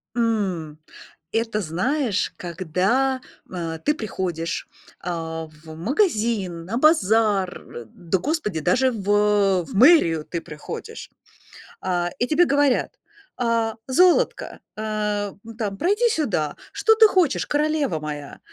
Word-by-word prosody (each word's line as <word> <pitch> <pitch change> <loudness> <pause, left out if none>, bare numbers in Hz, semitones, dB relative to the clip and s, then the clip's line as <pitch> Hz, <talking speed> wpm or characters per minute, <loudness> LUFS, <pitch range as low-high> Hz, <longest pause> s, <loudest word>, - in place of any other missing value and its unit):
М, 190 -10 -1 0.5
это, 225 -2 -1
знаешь, 205 - -1
когда, 190 +10 0 0.3
а, 165 -3 -4
ты 295 - +1
приходишь, 180 - -4 0.3
а, 165 -2 -4 0.2
в 160 -1 -10
магазин, 210 - 0
на 225 +6 -3
базар, 220 - +3
э, 120 - -7
да, 175 - -2
господи, 210 - -2
даже 255 - +2
в 205 -2 +2
в - - -14
мэрию 195 - +5
ты 170 -2 -4
приходишь. 150 0 -8 0.7
А, 175 -2 -1
и 245 - 0
тебе 340 +3 +4
говорят: 280 -3 +1 0.4
"А, 230 -2 0
золотко, 355 +7 +2 0.2
а, 210 -2 -2
ну 230 0 -10
там, 205 -4 -3
пройди 415 - +2
сюда. 210 - -1 0.2
Что 445 0 +3
ты 440 -1 +7
хочешь, 360 -8 +2
королева 295 - 0
моя? 150 -2 -7
210 Hz, 120 wpm, -23 LUFS, 175-265 Hz, 0.7 s, ты